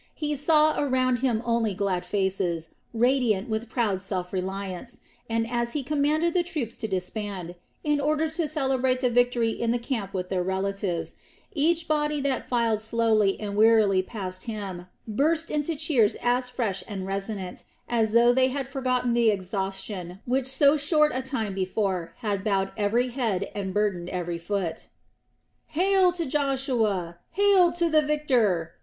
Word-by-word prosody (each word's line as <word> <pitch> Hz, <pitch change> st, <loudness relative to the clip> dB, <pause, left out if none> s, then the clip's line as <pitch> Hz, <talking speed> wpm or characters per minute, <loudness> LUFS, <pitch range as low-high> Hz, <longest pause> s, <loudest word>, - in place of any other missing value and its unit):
He 300 Hz, -1 st, -2 dB
saw 305 Hz, +1 st, +3 dB
around 255 Hz, -3 st, +2 dB
him 235 Hz, -3 st, 0 dB
only 230 Hz, -4 st, +1 dB
glad 185 Hz, -2 st, -1 dB
faces, 185 Hz, -4 st, -1 dB, 0.2 s
radiant 240 Hz, -3 st, +2 dB
with 220 Hz, +1 st, -2 dB
proud 215 Hz, -7 st, 0 dB
self 185 Hz, -2 st, -4 dB
reliance, 190 Hz, +4 st, -4 dB, 0.3 s
and 225 Hz, 0 st, 0 dB
as 235 Hz, 0 st, -1 dB
he 295 Hz, -, -2 dB
commanded 305 Hz, +4 st, +1 dB
the 360 Hz, -, +3 dB
troops 300 Hz, -, -3 dB
to 220 Hz, -, -3 dB
disband, 190 Hz, -2 st, -4 dB, 0.3 s
in 295 Hz, -1 st, +1 dB
order 305 Hz, +2 st, +1 dB
to 315 Hz, 0 st, -2 dB
celebrate 265 Hz, -3 st, 0 dB
the 250 Hz, -2 st, +2 dB
victory 245 Hz, -1 st, +2 dB
in 230 Hz, +1 st, -2 dB
the 240 Hz, -, +2 dB
camp 235 Hz, -5 st, -3 dB
with 180 Hz, -2 st, -4 dB
their 185 Hz, -1 st, 0 dB
relatives, 190 Hz, -1 st, -2 dB, 0.4 s
each 325 Hz, +1 st, +1 dB
body 300 Hz, -1 st, +1 dB
that 270 Hz, -2 st, -2 dB
filed 230 Hz, -3 st, +1 dB
slowly 220 Hz, -3 st, +2 dB
and 205 Hz, -2 st, -4 dB
wearily 215 Hz, -3 st, +5 dB
past 185 Hz, -2 st, -6 dB
him 195 Hz, -6 st, -6 dB, 0.2 s
burst 310 Hz, +9 st, +1 dB
into 300 Hz, +2 st, -1 dB
cheers 280 Hz, -8 st, +2 dB
as 250 Hz, +1 st, +1 dB
fresh 220 Hz, -6 st, -2 dB
and 195 Hz, -3 st, -5 dB
resonant 195 Hz, -1 st, -4 dB, 0.2 s
as 225 Hz, -2 st, +1 dB
though 240 Hz, +1 st, +6 dB
they 260 Hz, +1 st, +4 dB
had 270 Hz, 0 st, -3 dB
forgotten 255 Hz, -3 st, 0 dB
the 235 Hz, -1 st, +4 dB
exhaustion 190 Hz, -2 st, -3 dB
which 255 Hz, +1 st, 0 dB
so 280 Hz, +3 st, +4 dB
short 300 Hz, +1 st, +3 dB
a 260 Hz, -, -1 dB
time 255 Hz, -6 st, -3 dB
before 190 Hz, -2 st, -2 dB
had 205 Hz, -4 st, -1 dB
bowed 195 Hz, -2 st, 0 dB
every 230 Hz, +4 st, +1 dB
head 225 Hz, -7 st, -2 dB
and 195 Hz, -2 st, -3 dB
burdened 190 Hz, -3 st, -1 dB
every 175 Hz, -2 st, -3 dB
foot. 180 Hz, -1 st, -3 dB, 0.8 s
"Hail 370 Hz, +2 st, +3 dB
to 340 Hz, -2 st, -2 dB
Joshua! 250 Hz, -, 0 dB
Hail 395 Hz, -3 st, +5 dB
to 345 Hz, -1 st, +1 dB
the 310 Hz, -1 st, +4 dB
victor!" 245 Hz, -, +1 dB
230 Hz, 160 wpm, -26 LUFS, 195-275 Hz, 0.8 s, though